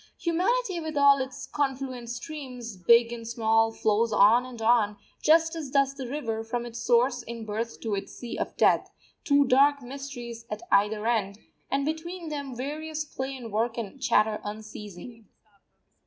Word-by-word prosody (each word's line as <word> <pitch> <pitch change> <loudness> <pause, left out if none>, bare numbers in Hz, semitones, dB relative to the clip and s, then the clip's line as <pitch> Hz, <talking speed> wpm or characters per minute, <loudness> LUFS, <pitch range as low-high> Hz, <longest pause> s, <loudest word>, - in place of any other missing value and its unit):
Humanity, 370 +4 0
with 315 -2 -4
all 280 -1 +6
its 260 -1 -5
confluent 265 -4 -3
streams, 250 -5 -6
big 235 +6 +4
and 230 -1 -7
small, 225 -1 +2
flows 220 +1 +1
on 225 +5 +5
and 245 -2 -10
on, 220 -2 +3 0.2
just 325 +1 +4
as 310 -4 -5
does 275 0 +2
the 270 -2 -6
river, 230 -5 -3
from 235 +1 -3
its 240 0 -7
source 245 +1 +3
in 230 -1 -7
birth 220 +2 -4
to 220 -3 -2
its 195 - -3
sea 240 - -6
of - - -4
death; - - +3 0.3
two 285 -2 +4
dark 280 +2 +4
mysteries 245 -3 -7
at 210 0 -5
either 210 +2 +3
end, 210 -4 0 0.3
and 275 +1 0
between 330 +2 -4
them 280 -4 -5
various 305 +4 -4
play 270 -2 -5
and 235 -3 -8
work 225 +3 0
and 230 +3 -6
chatter 215 -4 +2
unceasing. 210 +1 -9
245 Hz, 165 wpm, -27 LUFS, 225-280 Hz, 0.3 s, all